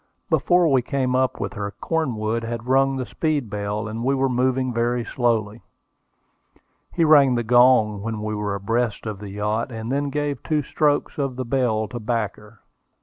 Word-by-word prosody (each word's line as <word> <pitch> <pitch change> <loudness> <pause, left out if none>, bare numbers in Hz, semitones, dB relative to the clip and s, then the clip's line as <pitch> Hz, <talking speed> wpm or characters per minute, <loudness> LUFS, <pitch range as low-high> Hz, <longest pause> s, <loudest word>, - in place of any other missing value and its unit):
Before 175 -1 +3
we 135 -4 +3
came 130 0 -1
up 130 0 +1
with - - -3
her 100 -2 -4
Cornwood 115 -8 -1
had 115 0 -5
rung 135 +1 +3
the 130 - -3
speed 140 +1 -2
bell, 105 +1 -3
and 110 +2 -5
we 135 +2 +2
were 135 0 +1
moving 130 0 0
very 120 +1 0
slowly. 115 -3 -1 1.3
He 170 - +1
rang 140 -5 +6
the 120 - 0
gong 120 -3 +4
when 110 0 -4
we 110 0 -3
were 105 -1 -2
abreast 115 +3 -1
of 105 -3 -5
the 105 -1 -8
yacht, 105 +5 -2
and 115 +1 -5
then 140 +1 0
gave 145 0 -2
two 150 -2 0
strokes 145 +2 0
of 135 -3 -1
the 130 0 -4
bell 115 -4 0
to 120 - -6
back 110 -2 -2
her. 105 0 -17
120 Hz, 185 wpm, -23 LUFS, 110-135 Hz, 1.3 s, rang